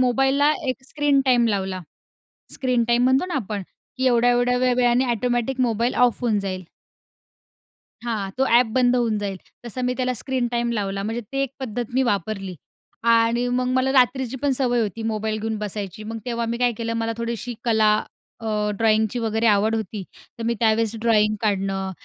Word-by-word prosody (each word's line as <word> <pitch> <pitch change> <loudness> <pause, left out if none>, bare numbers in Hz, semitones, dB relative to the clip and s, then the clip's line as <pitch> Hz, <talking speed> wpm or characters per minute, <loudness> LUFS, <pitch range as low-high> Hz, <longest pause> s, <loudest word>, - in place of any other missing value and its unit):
मोबाईलला 270 +4 +3 0.2
एक 255 +1 -2
screen 290 -2 +2
time 245 -2 +4
लावला. 190 -2 -2 0.7
स्क्रीन 250 -3 +1
टाईम 240 +1 +3
म्हणतो 260 +6 +3
ना 360 -5 -4
आपण, 210 -5 -3 0.3
की 260 - 0
एवढ्या, 245 0 +4
एवढ्या 245 +1 +2
वेळाने 250 0 +3
ऑटोमॅटिक 245 +3 -1
मोबाईल 235 0 +1
ऑफ 240 - -4
होऊन 220 -4 +1
जाईल. 185 -1 -4 1.4
हां. 210 -5 -3
तो 265 - +2
ॲप 240 +1 +5
बंद 250 -1 +4
होऊन 230 -3 +1
जाईल. 195 -2 -3 0.3
तसं 245 +2 -5
मी 250 - +1
त्याला 255 0 0
स्क्रीन 250 +1 -2
टाईम 235 0 0
लावला. 195 -3 -2
म्हणजे 225 +3 -3
ते 275 0 -1
एक 275 0 -5
पद्धत 240 -2 -4
मी 260 +1 +3
वापरली 195 -3 -2 0.6
आणि 230 +2 +2
मग 250 0 0
मला 260 +1 +2
रात्रीची 260 -1 +2
पण 285 - +2
सवय 245 -3 +1
होती 220 +1 -3
मोबाईल 215 -1 -2
घेऊन 220 0 -2
बसायची. 210 -1 -5
मग 225 +1 -5
तेव्हा 235 -1 -2
मी 235 +1 -2
काय 245 0 +2
केलं 230 0 -2
मला 225 - -1
थोडीशी 235 0 -4
कला 220 -2 +4 0.5
अ, 210 -1 -1
ड्रॉईंगची 220 +1 +2
वगैरे 225 0 -1
आवड 215 +2 +3
होती. 215 -2 -4 0.4
तर - - -4
मी 235 +1 +1
त्यावेळेस 225 0 +2
ड्रॉईंग 215 -2 +3
काढणं 195 -2 -1
235 Hz, 175 wpm, -23 LUFS, 215-250 Hz, 1.4 s, ॲप